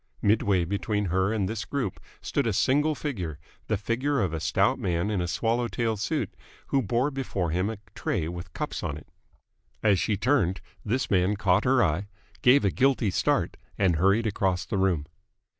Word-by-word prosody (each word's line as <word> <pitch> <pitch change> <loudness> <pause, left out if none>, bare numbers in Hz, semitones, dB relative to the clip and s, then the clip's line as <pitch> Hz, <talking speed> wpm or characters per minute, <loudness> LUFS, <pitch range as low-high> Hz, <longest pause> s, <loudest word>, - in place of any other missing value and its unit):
Midway 100 -4 +3
between 100 +3 -1
her 95 +3 +1
and 105 -4 0
this 110 +1 -3
group 130 -10 -3 0.2
stood - - -1
a - - +1
single 150 +4 +2
figure, 95 - -4 0.3
the 110 - +1
figure 125 +8 0
of 95 -7 0
a 80 - -2
stout 95 - +2
man 90 -2 0
in 100 -4 0
a 90 - -1
swallow 115 +7 0
tail 115 -2 -1
suit, 105 - -2 0.4
who 135 - +2
bore 120 +6 0
before 100 - -2
him 90 +5 0
a 110 - -4 0.2
tray 80 - -2
with 85 +1 -7
cups - - -4
on 70 - -3
it. 75 - -13 0.8
As 100 -4 +4
she 105 +3 0
turned, 100 - +2 0.2
this 125 +5 -1
man 95 +1 +3
caught 100 -1 +2
her 130 0 +4
eye, 90 +3 0 0.3
gave 125 -2 +5
a 100 - +3
guilty 130 -6 +2
start, - - +1 0.2
and 90 -5 +2
hurried 100 +7 +3
across 95 -4 0
the 100 - -2
room. 90 -6 +1
100 Hz, 185 wpm, -27 LUFS, 90-120 Hz, 0.8 s, gave